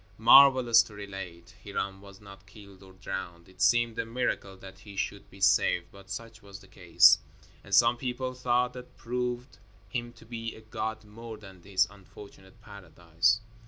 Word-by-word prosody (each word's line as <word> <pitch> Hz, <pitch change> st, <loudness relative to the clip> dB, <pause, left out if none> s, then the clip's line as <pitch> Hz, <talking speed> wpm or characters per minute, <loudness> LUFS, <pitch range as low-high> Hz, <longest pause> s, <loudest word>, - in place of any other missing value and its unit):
Marvelous 125 Hz, -1 st, +7 dB
to 110 Hz, -2 st, -10 dB
relate, 95 Hz, -4 st, -9 dB
Hiram 95 Hz, 0 st, -4 dB
was 100 Hz, -1 st, -14 dB
not 100 Hz, -1 st, -15 dB
killed 100 Hz, -1 st, -15 dB
or 95 Hz, -1 st, -16 dB
drowned. 90 Hz, -2 st, -7 dB
It 95 Hz, 0 st, -15 dB
seemed 115 Hz, +3 st, +2 dB
a -, -, 0 dB
miracle 115 Hz, -5 st, -3 dB
that 95 Hz, 0 st, -13 dB
he 100 Hz, +1 st, -13 dB
should 100 Hz, 0 st, -4 dB
be 95 Hz, -, -16 dB
saved, 95 Hz, -3 st, +2 dB
but 100 Hz, 0 st, -16 dB
such 115 Hz, +2 st, -8 dB
was 100 Hz, -2 st, -12 dB
the 95 Hz, -, -18 dB
case; 90 Hz, -2 st, +5 dB, 0.4 s
and 100 Hz, -1 st, -1 dB
some 120 Hz, +3 st, +5 dB
people 130 Hz, +1 st, -4 dB
thought 125 Hz, 0 st, 0 dB
that 125 Hz, 0 st, -12 dB
proved 125 Hz, +1 st, -4 dB, 0.3 s
him 120 Hz, +3 st, -4 dB
to -, -, -18 dB
be 115 Hz, 0 st, -6 dB
a 110 Hz, -, -14 dB
god 110 Hz, 0 st, -5 dB
more 110 Hz, +1 st, -10 dB
than 95 Hz, -4 st, -14 dB
his 95 Hz, -1 st, +1 dB
unfortunate 100 Hz, +1 st, -16 dB
paradise. 95 Hz, +2 st, -1 dB
105 Hz, 170 wpm, -28 LUFS, 95-115 Hz, 0.4 s, Marvelous